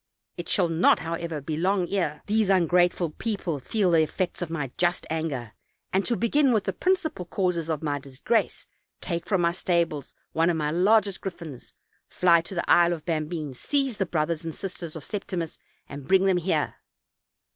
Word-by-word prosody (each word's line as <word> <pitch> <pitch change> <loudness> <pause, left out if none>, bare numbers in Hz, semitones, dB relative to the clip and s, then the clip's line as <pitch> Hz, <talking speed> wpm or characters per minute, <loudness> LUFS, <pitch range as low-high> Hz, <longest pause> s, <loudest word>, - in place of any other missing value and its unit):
It - - -7
shall 185 -4 +3
not, 165 +1 +4
however, 165 -1 -4
be 150 +3 -3
long 185 +1 +1
ere 170 -7 -1
these 215 -1 +1
ungrateful 175 -2 +3
people 185 -5 -3
feel 190 - +1
the 165 -1 +5
effects 175 +4 -2
of 175 - -3
my 150 -6 -3
just 175 +1 0
anger; 145 -9 -3 0.4
and, 190 +1 +3
to 240 - +1
begin 270 +3 +3
with 215 -3 +2
the - - -2
principal 365 - 0
causes 175 -3 -1
of 160 -1 -2
my 145 -2 -1
disgrace, 140 - -1 0.3
take 170 -2 -4
from 190 -4 +2
my 170 0 +3
stables 170 -5 -1 0.2
one 165 +1 +2
of 170 - +1
my 150 -1 -1
largest 200 +3 +3
griffins, 170 -8 -8 0.3
fly 170 -2 +4
to 190 +4 -9
the 170 - -2
Isle 175 0 +5
of 160 -3 -7
Bambine, 155 -3 -2
seize 270 - -1
the 195 - 0
brothers 165 0 -1
and 165 -1 -5
sisters 175 -4 -6
of 160 - -7
Septimus, 185 -5 -4 0.3
and 140 -1 -9
bring 190 0 +4
them 190 -2 +3
here. 165 -4 -1
170 Hz, 180 wpm, -26 LUFS, 160-190 Hz, 0.4 s, the